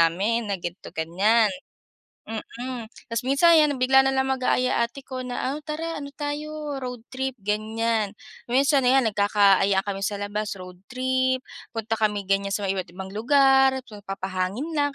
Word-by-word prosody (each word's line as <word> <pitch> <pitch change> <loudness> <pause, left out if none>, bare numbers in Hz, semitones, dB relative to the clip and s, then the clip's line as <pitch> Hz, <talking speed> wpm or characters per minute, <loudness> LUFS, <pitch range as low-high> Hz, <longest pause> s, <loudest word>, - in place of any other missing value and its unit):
namin 205 +7 +2
na 200 - 0
gan'to-ganyan. 185 - +1 0.7
Mm. 235 +2 -6 0.2
Tapos 230 +2 -2
minsan 320 +5 +6
'yan, 300 -2 +4
ah, - - -7
bigla 265 +1 +5
na 270 - +2
lang 265 0 +1
mag-aaya 255 -2 +1
ate 270 +4 -12
ko 260 -1 -6
na, 245 - -4
"Ah, 295 - -4
tara. 325 +1 -3
Ano 285 - -6
tayo, 295 0 -4
road 250 -3 -6
trip," 265 0 -3
ganyan. 215 0 -1 0.3
Minsan 270 +2 +3
ayan, 265 +1 +5
nagkaka-ayaan 200 -1 +3
kami 195 -1 -3
sa 205 -1 -3
labas 210 0 -3
road 180 -1 -10
trip, 260 +1 0 0.3
punta 225 0 -2
kami 210 -2 +1
ganyan 195 0 +1
sa 205 - -2
mga 195 - +1
iba't 180 -2 -5
ibang 190 0 -7
lugar, 270 +3 +5
magpapahangin 195 - -4
lang 285 -1 +1
230 Hz, 160 wpm, -25 LUFS, 200-265 Hz, 0.7 s, minsan